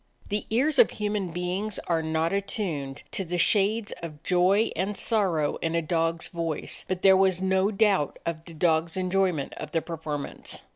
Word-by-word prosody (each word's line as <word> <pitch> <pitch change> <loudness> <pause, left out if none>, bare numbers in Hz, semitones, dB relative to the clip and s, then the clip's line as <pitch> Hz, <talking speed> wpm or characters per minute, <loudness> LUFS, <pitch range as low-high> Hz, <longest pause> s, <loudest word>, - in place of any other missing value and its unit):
The 210 0 -2
ears 275 +6 +2
of 240 - +7
human 210 -3 -2
beings 180 +5 -2
are 165 -2 +1
not 160 +2 0
attuned 175 - -3
to 195 - -1
the 175 0 -3
shades 205 +4 +2
of 155 -2 -8
joy 185 +4 +3
and 195 +1 -2
sorrow 185 -10 +1
in 165 0 -2
a 170 - +2
dog's 165 +1 -1
voice, 165 -3 -3
but 185 -1 -3
there 190 -1 +7
was 190 -1 +3
no 190 +1 +2
doubt 200 -8 +2
of 165 -1 -3
the 165 - -11
dog's 165 +1 +1
enjoyment 185 -5 0
of 155 - -7
the 165 - +2
perform 155 -4 -4
ance. - - -5
180 Hz, 180 wpm, -27 LUFS, 165-200 Hz, -, of